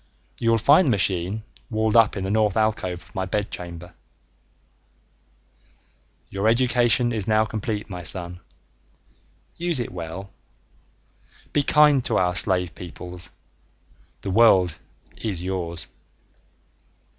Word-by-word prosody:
You 115 - +1
will 115 - +4
find 145 - +5
the 115 -6 +3
machine 95 +3 0 0.3
walled 110 0 0
up 115 -2 +5
in 95 - -3
the 95 - -2
North 110 -1 +2
alcove 100 -5 0
of 95 - -21
my 95 -1 -3
bedchamber. 90 -3 -5 2.4
Your 100 +2 -1
education 120 -1 +3
is 105 -2 -3
now 110 0 +3
complete 110 -1 -4
my 90 -3 -7
son, 90 0 -3 1.2
use 170 -4 +1
it 120 - -3
well. 90 +3 -7 1.2
Be 145 - +3
kind 145 -2 +4
to - - +1
our 90 0 +2
slave 90 -2 +2
peoples, 90 0 -7 0.9
the 100 - -4
world 95 -6 +4 0.4
is 95 -6 -3
yours. 85 -3 -3
100 Hz, 120 wpm, -23 LUFS, 90-115 Hz, 2.4 s, find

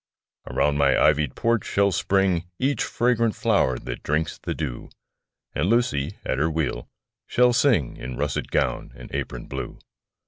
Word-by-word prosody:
Around 75 0 +1
my 70 -1 +4
ivy'd 75 -3 +3
porch 115 -2 +1
shall 100 0 +2
spring 95 -1 +1
Each 140 +2 0
fragrant 115 -2 +1
flower 65 -1 +2
that - - -6
drinks 75 +1 -1
the - - -4
dew; 70 -7 -5 0.6
And 80 +7 0
Lucy, 105 - +1
at 65 - -1
her 80 +3 +2
wheel, 75 -6 -2 0.4
shall 125 0 +4
sing 120 - +2
In 65 -1 -6
russet 75 -1 -2
gown - - -1
and - - -12
apron - - -4
blue. - - -6
80 Hz, 150 wpm, -24 LUFS, 70-115 Hz, 0.6 s, my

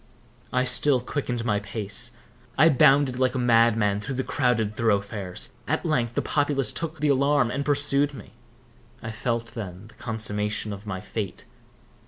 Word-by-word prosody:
I 125 0 +2
still 130 +1 +3
quickened 125 -2 -3
my 105 -3 +1
pace. 105 +3 -3 0.5
I 155 +4 +7
bounded 135 -2 +4
like 130 0 +1
a - - 0
madman 115 -4 +3
through 135 +5 -5
the 130 - -1
crowded 120 -8 0
thoroughfares. 100 -4 -2
At - - -1
length, 120 -7 0
the - - 0
populace 145 -5 +2
took 160 -1 -4
the 150 - +2
alarm, 140 -2 +3
and 140 +3 -2
pursued 145 0 +2
me. 105 -4 -12 0.7
I 110 - -4
felt 115 +1 -3
then 100 -2 -7
the - - -18
consummation 105 -2 -2
of 100 +2 -10
my 95 -2 -4
fate. 100 -3 -5
120 Hz, 160 wpm, -25 LUFS, 105-140 Hz, 0.7 s, I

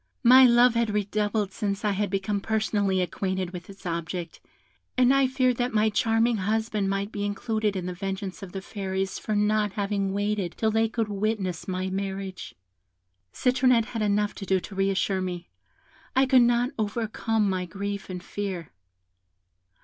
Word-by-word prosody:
My 255 +2 +9
love 240 0 +6
had 230 -1 +1
redoubled 210 0 0
since 200 0 -3
I 210 - +3
had 205 +1 -1
become 195 +1 -1
personally 205 -3 +1
acquainted 185 +1 -2
with 180 0 -9
its 195 -1 -13
object, 170 0 -4 0.6
and 255 +1 +5
I 275 -1 +4
feared 255 -2 +1
that 245 -2 -1
my 215 +1 +3
charming 225 +2 +2
husband 210 0 0
might 195 +1 -2
be 205 - -4
included 210 +1 -1
in 185 -2 -3
the 180 - -3
vengeance 195 +1 -5
of 195 -2 -8
the 190 0 -6
Fairies 190 -2 -3
for 215 - -2
not 210 0 +2
having 200 -1 -1
waited 205 -3 -1
till 220 -1 +1
they 225 +1 +2
could 225 -1 -1
witness 200 -3 -2
my 185 0 -2
marriage. 195 -1 -4 0.8
Citronette 255 -2 +3
had 225 - -2
enough 210 0 +1
to 195 - -7
do 190 -1 +3
to 200 - -9
re 195 0 +1
assure 190 0 0
me; 180 -1 -5 0.7
I 265 +1 +5
could 260 -1 +5
not 240 +2 +3
overcome 220 0 0
my 185 -1 -1
grief 200 +3 -5
and 180 -1 -6
fear. 190 -6 -5
205 Hz, 170 wpm, -26 LUFS, 190-220 Hz, 0.8 s, My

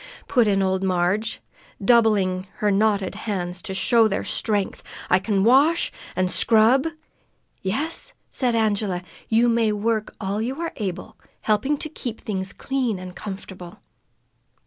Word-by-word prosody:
put 240 -4 +3
in 195 -1 +2
old 190 0 0
Marg, 185 +3 +1 0.5
doubling 200 -4 +3
her 210 -1 +1
knotted 200 -1 +1
hands 180 -4 -4
to 215 - -6
show 230 +2 +4
their 200 -1 -2
strength. 205 -3 -1 0.3
"I 180 - +6
can 195 0 0
wash, 280 +9 +4 0.2
an' 185 0 +1
scrub 230 - +4 0.4
" - - -43 0.3
"Yes," 280 +13 -3 0.2
said 245 -3 0
Angela, 205 -5 0 0.3
"you 230 +2 +4
may 230 -2 +2
work 215 +1 -1
all 200 +1 -2
you 260 +6 -3
are 335 -1 -3
able, 190 -4 -5 0.2
helping 220 +8 +1
to 310 - -3
keep 250 -7 -6
things 190 -2 -3
clean 255 -6 -2
and 180 0 -9
comfortable." 190 -3 -8
210 Hz, 145 wpm, -23 LUFS, 190-235 Hz, 0.5 s, I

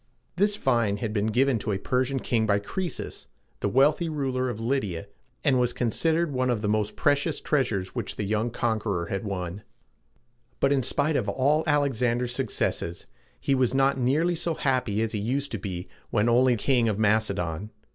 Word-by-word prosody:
This 205 +3 +2
vine 115 - +1
had 105 0 -3
been 105 0 0
given 125 +2 +2
to 105 - -3
a 100 - 0
Persian 130 +5 0
king 110 -2 +1
by 100 -1 +3
Croe´sus, 175 - -5 0.3
the 100 - 0
wealthy 145 - +3
ruler 130 -4 -1
of 120 - -4
Lyd´i 115 -6 -1
a, 80 - -7 0.4
and 130 -2 +3
was 125 -1 +1
considered 160 +7 +1
one 130 0 0
of 115 -3 0
the - - 0
most 105 0 0
precious 145 +1 +1
treasures 115 -11 -1
which - - -4
the - - -3
young 110 +3 0
conqueror 110 -6 -1
had 95 - -2
won. 95 -1 -4 1.0
But 140 - +3
in 135 - +2
spite 145 +4 +1
of 110 -7 0
all 145 +8 +2
Alexander's 125 -4 +1
successes, 110 -8 -1 0.3
he 140 - 0
was 130 -1 +2
not 135 0 +3
nearly 150 +8 +2
so 165 0 -1
happy 125 -7 0
as 115 - -2
he 105 - -2
used 135 +7 -1
to - - -3
be 90 -3 -5 0.2
when 105 0 +1
only 125 +1 +4
king 120 0 +2
of 105 - -1
Macedon. 100 -4 0
120 Hz, 185 wpm, -26 LUFS, 105-135 Hz, 1.0 s, only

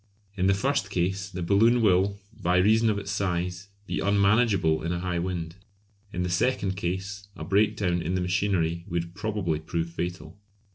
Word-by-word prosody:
In 95 -1 +1
the 100 - +4
first 140 +7 0
case 95 +2 -1
the 90 -2 -5
balloon 110 +7 +4
will, 100 -2 +3 0.2
by 90 +1 +2
reason 110 +4 +4
of 105 - +1
its 100 -1 -4
size, 90 0 -2 0.2
be - - -3
unmanageable 100 -4 +3
in 85 - -2
a 90 - -1
high 90 -1 -1
wind; 85 -1 -4 0.5
in 90 - -2
the - - -1
second 95 +1 0
case, 95 +2 -4
a - - -7
breakdown 100 -3 +1
in 85 +3 -2
the 90 - 0
machinery 90 -3 0
would 85 0 -3
probably 100 -6 -2
prove 85 +1 -3
fatal. 85 +1 -5
95 Hz, 175 wpm, -27 LUFS, 85-100 Hz, 0.5 s, the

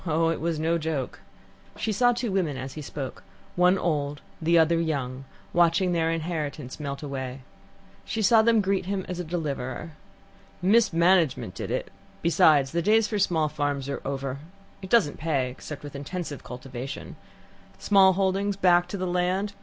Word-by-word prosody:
Oh, 165 +1 +2
it 165 - -2
was 165 -1 -1
no 165 +2 +1
joke." 155 -5 -3 0.6
She 220 - -1
saw 245 +4 +4
two 240 -2 -2
women 170 -8 0
as 130 0 -6
he 155 - -7
spoke, 140 -2 -6 0.3
one 180 +2 +4
old, 145 -5 -1 0.2
the 170 +1 +3
other 165 +1 +4
young, 135 -5 -3 0.3
watching 175 +2 +3
their 165 -2 +1
inheritance 155 -5 -4
melt 140 -1 -5
away. 135 -2 -5 0.6
She 220 -1 -3
saw 220 +3 +6
them 225 -1 +4
greet 190 -2 0
him 195 -1 -2
as 180 -1 -5
a - - -2
deliverer. 155 -3 -4 0.7
"Mismanagement 180 - +3
did - - -6
it - - -3 0.3
besides, 150 -5 +4
the 170 - 0
days 215 +4 +3
for 210 -1 -2
small 160 -5 +2
farms 145 -2 -2
are 140 - -3
over. 135 0 -3 0.4
It 190 - -8
doesn't 200 -11 +3
pay 140 -5 0
except 145 +3 -9
with 145 -1 -9
intensive 145 +1 -5
cultivation. 125 +1 -7 0.6
Small 195 -2 +5
holdings, 195 +1 0
back 175 -2 +4
to 200 - -5
the 185 - -2
land 180 +3 0
ah! - - -28
165 Hz, 170 wpm, -26 LUFS, 145-185 Hz, 0.7 s, saw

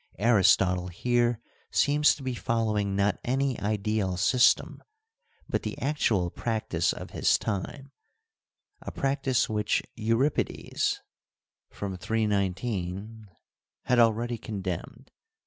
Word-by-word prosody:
Aristotle 95 -4 +3
here 120 +5 +1 0.3
seems 150 +1 +3
to 140 - -11
be 130 -1 -2
following 110 -4 -1
not 100 +1 +1
any 135 0 0
ideal 105 -2 -1
system, 125 +7 +3 0.7
but - - -1
the - - -5
actual 110 - +1
practice 110 -8 -1
of - - -8
his - - +3
time, 125 +7 -4 0.9
a - - -6
practice 135 -2 0
which 105 -1 0
Euripides 115 +6 0 0.7
(fr. 100 -1 -5
319) 100 0 -2 0.6
had 125 0 +2
already 115 +1 +2
condemned. 105 +5 -6
110 Hz, 100 wpm, -27 LUFS, 100-120 Hz, 0.9 s, Aristotle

